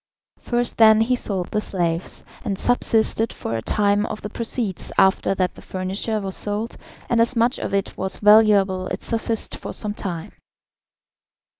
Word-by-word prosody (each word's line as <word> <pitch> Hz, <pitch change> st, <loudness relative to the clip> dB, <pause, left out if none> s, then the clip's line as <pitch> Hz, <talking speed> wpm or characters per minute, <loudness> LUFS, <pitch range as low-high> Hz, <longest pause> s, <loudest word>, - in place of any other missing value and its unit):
First 240 Hz, 0 st, -2 dB
then 220 Hz, -1 st, +7 dB
he 250 Hz, +3 st, +2 dB
sold 195 Hz, -7 st, -2 dB
the 210 Hz, -, 0 dB
slaves, 170 Hz, -4 st, -2 dB, 0.2 s
and 195 Hz, -, -2 dB
subsisted 225 Hz, -1 st, +2 dB
for 115 Hz, -, -5 dB
a 115 Hz, -, -2 dB
time 205 Hz, -, +1 dB
on -, -, -5 dB
the 210 Hz, -, -6 dB
proceeds, 225 Hz, -4 st, -3 dB
after 190 Hz, 0 st, +3 dB
that 185 Hz, -1 st, 0 dB
the -, -, -14 dB
furniture 190 Hz, +4 st, -3 dB
was 195 Hz, -2 st, -3 dB
sold, 210 Hz, +3 st, -3 dB, 0.3 s
and 235 Hz, -1 st, +2 dB
as 235 Hz, +2 st, +1 dB
much 235 Hz, +2 st, +1 dB
of -, -, -4 dB
it 195 Hz, 0 st, -1 dB
was 190 Hz, 0 st, -1 dB
valuable 205 Hz, -3 st, +4 dB
it -, -, -5 dB
sufficed 225 Hz, -1 st, -1 dB
for -, -, -7 dB
some 210 Hz, -1 st, -3 dB
time. 175 Hz, -5 st, -5 dB
210 Hz, 165 wpm, -22 LUFS, 190-225 Hz, 0.3 s, then